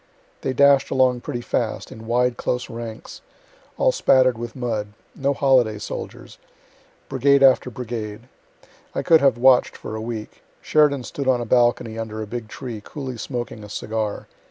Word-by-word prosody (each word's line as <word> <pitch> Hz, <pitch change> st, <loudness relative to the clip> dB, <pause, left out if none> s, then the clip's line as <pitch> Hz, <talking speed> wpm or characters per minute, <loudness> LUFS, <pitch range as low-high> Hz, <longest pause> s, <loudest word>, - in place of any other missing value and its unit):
They -, -, -1 dB
dash'd 140 Hz, 0 st, +5 dB
along 130 Hz, -2 st, +2 dB
pretty 120 Hz, -, -4 dB
fast, -, -, -2 dB
in 110 Hz, 0 st, -10 dB
wide 125 Hz, +1 st, +2 dB
close 125 Hz, 0 st, -3 dB
ranks, 115 Hz, -1 st, -8 dB, 0.6 s
all -, -, +3 dB
spatter'd 130 Hz, -, +4 dB
with 120 Hz, 0 st, -7 dB
mud; 110 Hz, -5 st, -3 dB, 0.2 s
no 140 Hz, 0 st, 0 dB
holiday 130 Hz, -6 st, +3 dB
soldiers; 105 Hz, -, -8 dB, 0.7 s
brigade 140 Hz, 0 st, +3 dB
after 130 Hz, -1 st, +5 dB
brigade. 110 Hz, -3 st, -6 dB, 0.7 s
I -, -, -1 dB
could 160 Hz, -1 st, +5 dB
have 135 Hz, -4 st, +4 dB
watch'd 130 Hz, +1 st, +4 dB
for 110 Hz, -, -7 dB
a 110 Hz, -, -4 dB
week. 110 Hz, -1 st, -6 dB, 0.2 s
Sheridan 145 Hz, -4 st, +2 dB
stood 140 Hz, +2 st, -5 dB
on 130 Hz, -2 st, +3 dB
a 120 Hz, -, -3 dB
balcony, 120 Hz, -1 st, +2 dB
under 110 Hz, -1 st, -5 dB
a 110 Hz, -, -3 dB
big 115 Hz, +1 st, -6 dB
tree, 115 Hz, -2 st, -7 dB
coolly 130 Hz, -2 st, -6 dB
smoking 120 Hz, -4 st, -5 dB
a 105 Hz, -, -10 dB
cigar. 110 Hz, 0 st, -3 dB
120 Hz, 160 wpm, -22 LUFS, 110-130 Hz, 0.7 s, dash'd